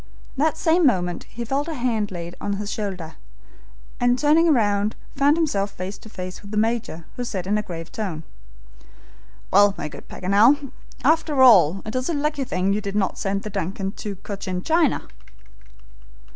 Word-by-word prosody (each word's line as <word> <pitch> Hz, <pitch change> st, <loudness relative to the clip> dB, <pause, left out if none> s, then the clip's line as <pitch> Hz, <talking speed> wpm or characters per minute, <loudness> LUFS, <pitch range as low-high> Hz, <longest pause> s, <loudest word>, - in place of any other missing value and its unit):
That 310 Hz, +3 st, +1 dB
same 330 Hz, +2 st, +3 dB
moment 180 Hz, -7 st, 0 dB
he 235 Hz, +1 st, -7 dB
felt 275 Hz, +6 st, -1 dB
a 325 Hz, -, -4 dB
hand 230 Hz, -5 st, 0 dB
laid 175 Hz, -1 st, -7 dB
on 205 Hz, -, -1 dB
his 205 Hz, +1 st, -4 dB
shoulder, 185 Hz, -7 st, -5 dB, 0.8 s
and 245 Hz, 0 st, +3 dB
turning 315 Hz, +4 st, +4 dB
round 210 Hz, -4 st, +2 dB, 0.2 s
found 285 Hz, +3 st, +4 dB
himself 205 Hz, -12 st, 0 dB
face 185 Hz, +3 st, -6 dB
to 220 Hz, -, -13 dB
face 185 Hz, -2 st, -7 dB
with 200 Hz, -, -12 dB
the 210 Hz, -, -3 dB
Major, 220 Hz, -7 st, -1 dB
who 245 Hz, -, -2 dB
said 190 Hz, -7 st, -4 dB
in 200 Hz, +2 st, +1 dB
a 210 Hz, -, +1 dB
grave 165 Hz, -5 st, -7 dB
tone: 185 Hz, -8 st, -4 dB, 1.3 s
"Well, 200 Hz, +1 st, +5 dB
my 150 Hz, -, -4 dB
good -, -, -11 dB
Paganel, 235 Hz, +9 st, +3 dB, 0.3 s
after 300 Hz, -1 st, +3 dB
all, 195 Hz, -7 st, +6 dB
it 215 Hz, -, -5 dB
is 255 Hz, +3 st, -1 dB
a 335 Hz, -, 0 dB
lucky 290 Hz, -1 st, -1 dB
thing 195 Hz, -5 st, 0 dB
you 210 Hz, -, -1 dB
did 200 Hz, -1 st, -5 dB
not 200 Hz, -2 st, 0 dB
send 195 Hz, 0 st, -1 dB
the 215 Hz, -, -6 dB
DUNCAN 195 Hz, +2 st, -3 dB
to 205 Hz, -2 st, -5 dB
Cochin 185 Hz, -1 st, -5 dB
China!" 325 Hz, -3 st, +2 dB
210 Hz, 175 wpm, -23 LUFS, 190-265 Hz, 1.3 s, all